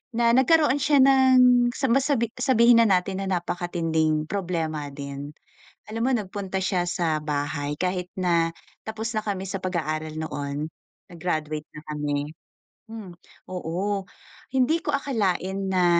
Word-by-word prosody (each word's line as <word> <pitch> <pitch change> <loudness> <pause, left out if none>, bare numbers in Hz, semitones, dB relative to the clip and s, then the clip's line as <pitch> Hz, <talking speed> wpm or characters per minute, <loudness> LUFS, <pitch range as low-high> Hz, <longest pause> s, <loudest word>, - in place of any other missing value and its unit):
Na 235 0 +3
nagkaroon 290 +3 +4
siya 285 -1 +4
ng 255 -2 +6
sa 265 -4 0
masabi 265 -4 +2
sabihin 240 -2 +5
na 230 - +5
natin 190 0 +1
na 195 - -3
napakatinding 165 -3 0
problema 160 -5 -3
din. 140 +1 -7 0.5
Alam 225 +1 -3
mo 265 - +2
nagpunta 195 -3 -2
siya 180 -1 0
sa 170 -3 0
bahay 145 0 -2
kahit 180 0 -2
na 170 -3 +1 0.3
tapos 220 +1 -4
na 215 - -1
kami 195 -2 -3
sa 195 - -3
pag-aaral 155 -4 -3
noon, 145 -1 -4 0.4
nag-graduate 155 -4 -3
na 150 - -9
kami 145 -1 -2 0.6
hmm, 215 -6 -9 0.3
oo. 185 +3 -2 0.5
Hindi 265 +5 +3
ko 295 - -1
akalain 195 -8 -1
na 180 -1 +3
185 Hz, 135 wpm, -25 LUFS, 160-230 Hz, 0.6 s, ng